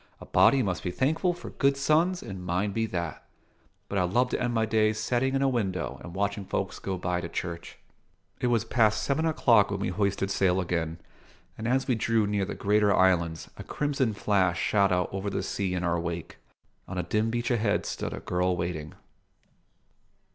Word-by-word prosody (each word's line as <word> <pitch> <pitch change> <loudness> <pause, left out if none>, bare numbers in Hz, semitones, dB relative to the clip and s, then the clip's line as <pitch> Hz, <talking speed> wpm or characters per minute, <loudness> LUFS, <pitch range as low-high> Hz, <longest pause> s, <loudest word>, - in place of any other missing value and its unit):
"A - - -10
body 135 -2 +4
must 90 -6 -2
be 90 - -3
thankful 160 - +1
for 175 - -9
good 140 -1 +2
sons, 165 +6 +2
and 95 -2 -7
mine 90 +4 -1
be 115 +2 -1
that. 85 -5 -4 0.6
But 100 - -1
I'd 90 -1 +1
love 125 +6 +2
to - - -2
end 120 - 0
my 115 -1 +1
days 110 -1 +2
settin' 125 +4 0
in 135 - +1
a - - +3
window 100 -9 -2
and 85 - -9
watchin' 100 +1 -1
folks - - -3
go 95 -1 -3
by 90 0 -1
to 85 - -5
church." 85 0 -5 0.6
It - - 0
was 120 -3 +1
past 110 -4 +2
seven 155 +4 +1
o'clock 115 -9 +4
when 100 -1 -3
we 95 - -1
hoisted 100 0 0
sail 95 -2 +2
again, 85 -2 -2 0.6
and 110 - -4
as 130 +2 +1
we 130 - +3
drew 115 -1 +1
near 100 -1 0
the - - -5
greater 105 0 +2
islands 85 -4 +2
a - - -7
crimson 140 -6 -1
flash 95 -4 +1
shot 100 -2 +2
out 90 -1 +1
over 95 +1 -2
the - - -2
sea 95 -3 -2
in 90 - -2
our 85 -1 +1
wake. 85 -1 -5 0.5
On 95 - -6
a 90 - 0
dim 110 +1 0
beach 120 +2 -1
ahead 105 -3 +1
stood - - -4
a - - -5
girl 90 0 0
waiting. 85 -4 -4
100 Hz, 200 wpm, -27 LUFS, 90-120 Hz, 0.6 s, body